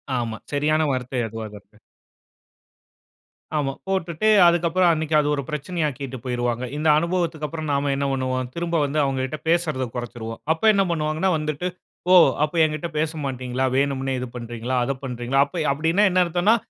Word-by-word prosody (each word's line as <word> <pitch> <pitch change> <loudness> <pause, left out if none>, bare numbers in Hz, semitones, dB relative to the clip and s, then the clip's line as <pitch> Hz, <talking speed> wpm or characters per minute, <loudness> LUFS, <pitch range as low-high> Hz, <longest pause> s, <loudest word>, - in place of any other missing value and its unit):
ஆமா 115 -2 -2
சரியான 150 +2 +2
வார்த்தை 130 0 -2
அதுவாக 110 -1 -7
இருக்கு. 100 +2 -27 1.8
ஆமா. 135 -2 -1
போட்டுட்டு 190 +1 0 0.2
அதுக்கப்பறம், 175 +1 +3
அன்னைக்கு 160 0 -1
அது 150 - +1
ஒரு 140 - -3
பிரச்சனையாக்கிட்டு 150 -4 -3
போய்ருவாங்க. 120 -1 -1
இந்த 155 +1 -1
அனுபவத்துக்கப்புறம், 165 -2 -2
நாம 140 0 +1
என்ன 140 0 -1
பண்ணுவோம்? 130 -1 -2
திரும்ப 170 0 -2
வந்து 145 +2 -1
அவங்ககிட்ட 135 +1 -2
பேசுறத 160 -6 +1
கொறச்சிருவோம். 120 -2 -6
அப்ப 160 - -13
என்ன 200 -1 +3
பண்ணுவாங்கன்னா 155 +2 0
வந்துட்டு, 155 +3 -3 0.4
"ஓ - - +8 0.3
அப்ப 155 - -10
என்கிட்ட 155 +2 -1
பேசமாட்டீங்களா? 130 -5 -2
வேணும்னே 135 -1 0
இது 125 - -4
பண்றீங்களா? 120 +1 -3
அத 135 +2 -1
பண்றீங்களா?" 125 +2 +1
அப்ப 170 +2 -4
அப்படீன்னா 165 +8 +2
என்ன 180 0 +4
அர்த்தம்ன்னா, 175 +6 +3
145 Hz, 145 wpm, -23 LUFS, 130-165 Hz, 1.8 s, ஓ